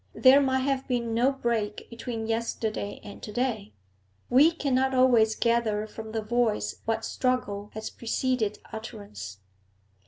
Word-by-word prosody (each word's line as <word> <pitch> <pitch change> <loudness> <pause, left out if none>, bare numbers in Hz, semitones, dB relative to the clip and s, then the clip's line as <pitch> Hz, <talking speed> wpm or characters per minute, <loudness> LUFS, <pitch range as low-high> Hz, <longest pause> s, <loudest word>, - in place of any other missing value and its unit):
There 270 +2 +7
might 265 -1 +2
have 270 0 -1
been 235 -3 -1
no 245 +4 +3
break 235 -6 -2
between 230 -1 -4
yesterday 225 -2 -2
and 205 - -10
to 210 - -7
day. 220 -3 -1 0.6
We 285 +7 +7
cannot 265 -4 +1
always 235 -4 +5
gather 230 -3 +1
from 220 0 -8
the 220 -1 -2
voice 235 -1 0
what 225 0 -1
struggle 210 -6 -1
has 220 0 -5
preceded 235 -2 -1 0.2
utterance. 155 - -8
230 Hz, 135 wpm, -27 LUFS, 215-255 Hz, 0.6 s, There